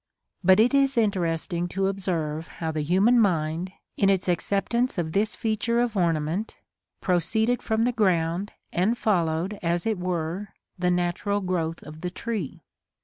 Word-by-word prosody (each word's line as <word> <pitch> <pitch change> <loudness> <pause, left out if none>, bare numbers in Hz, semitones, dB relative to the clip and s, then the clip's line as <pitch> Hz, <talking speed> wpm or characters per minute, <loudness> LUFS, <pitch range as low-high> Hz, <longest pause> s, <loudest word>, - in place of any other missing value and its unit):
But 190 +2 +6
it 235 +5 +4
is 275 -2 +3
interesting 175 -5 0
to 195 +2 -1
observe 165 -5 -2
how 160 -1 -2
the 155 -1 -2
human 195 +10 +4
mind, 170 -3 +1 0.3
in 195 - +3
its 190 -2 +1
acceptance 200 +7 0
of 165 -2 -1
this 210 +5 +1
feature 230 +1 0
of 240 -2 0
ornament, 170 +2 0 0.4
proceeded 220 +7 +1
from 220 0 0
the 245 - +2
ground, 185 -3 +1 0.2
and 205 +7 +1
followed, 180 -1 0
as 170 0 0
it 220 -4 0
were, 180 +2 -3 0.2
the 180 0 +2
natural 180 +3 0
growth 170 -4 -2
of 155 +1 -10
the 180 - -2
tree. 200 - -5
185 Hz, 150 wpm, -26 LUFS, 170-215 Hz, 0.4 s, But